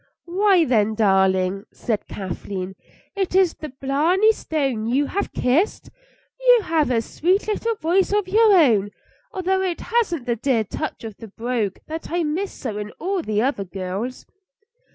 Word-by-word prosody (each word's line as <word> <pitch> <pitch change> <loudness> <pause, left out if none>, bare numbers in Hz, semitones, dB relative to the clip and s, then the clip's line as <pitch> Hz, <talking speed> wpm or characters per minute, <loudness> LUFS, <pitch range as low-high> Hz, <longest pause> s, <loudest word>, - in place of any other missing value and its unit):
"Why, 370 0 +3
then, 220 -4 +2
darling," 190 -2 +2
said 220 -4 -3
Kathleen, 190 0 -5 0.4
"is 385 -2 -1 0.2
it - - -32
the 305 - -6
Blarney 300 +11 +2
Stone 270 - -2
you 270 +5 +2
have 400 +7 -3
kissed? 305 - 0 0.5
You - - +5
have 315 -6 +1
a 230 -2 +1
sweet 370 - 0
little 455 +2 -1
voice 370 +1 +1
of 415 -2 +1
your 435 +3 +5
own, 235 - +4 0.4
although 380 0 0
it 365 -3 -2
hasn't 370 - 0
the 240 -2 0
dear 240 -1 +1
touch 295 +8 -5
of 220 -3 -7
the 225 - -10
brogue 225 -2 -2
that 320 +1 -6
I 345 +1 0
miss 335 +6 -2
so 215 -5 -5
in 210 0 -5
all 375 +2 -1
the 215 -6 0
other 260 -6 0
girls." 195 +6 -5
280 Hz, 160 wpm, -22 LUFS, -, 0.5 s, You